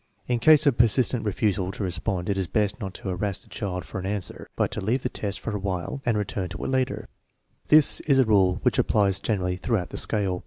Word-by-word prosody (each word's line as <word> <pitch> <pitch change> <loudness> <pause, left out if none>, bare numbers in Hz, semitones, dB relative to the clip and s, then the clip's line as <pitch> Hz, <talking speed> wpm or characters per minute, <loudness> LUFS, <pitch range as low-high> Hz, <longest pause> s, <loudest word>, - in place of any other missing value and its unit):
In 120 -1 0
case 155 +4 +6
of 135 -5 +2
persistent 120 +1 +3
refusal 100 -2 0
to - - -5
respond 90 +1 -2
it 100 - 0
is 95 -2 -2
best 105 +4 0
not 95 -4 -6
to - - -10
harass 95 +1 -2
the - - -21
child 90 -4 -4
for - - -6
an 95 - -6
answer, 100 -2 -4
but - - 0
to - - -4
leave 120 +7 0
the 125 - -1
test 100 -4 -4
for 110 - -4
a - - -2
while 95 +7 -4
and 115 -3 +2
return 95 -2 -3
to - - -7
it - - -2
later. 130 -1 -1 0.6
This 155 -1 +6
is 140 -3 +4
a 130 - +5
rule 95 -4 +3
which 125 +1 +2
applies 100 -5 +2
generally 90 -5 -1
throughout 95 -4 -1
the - - -5
scale. 100 -4 0
105 Hz, 235 wpm, -25 LUFS, 95-120 Hz, 0.6 s, case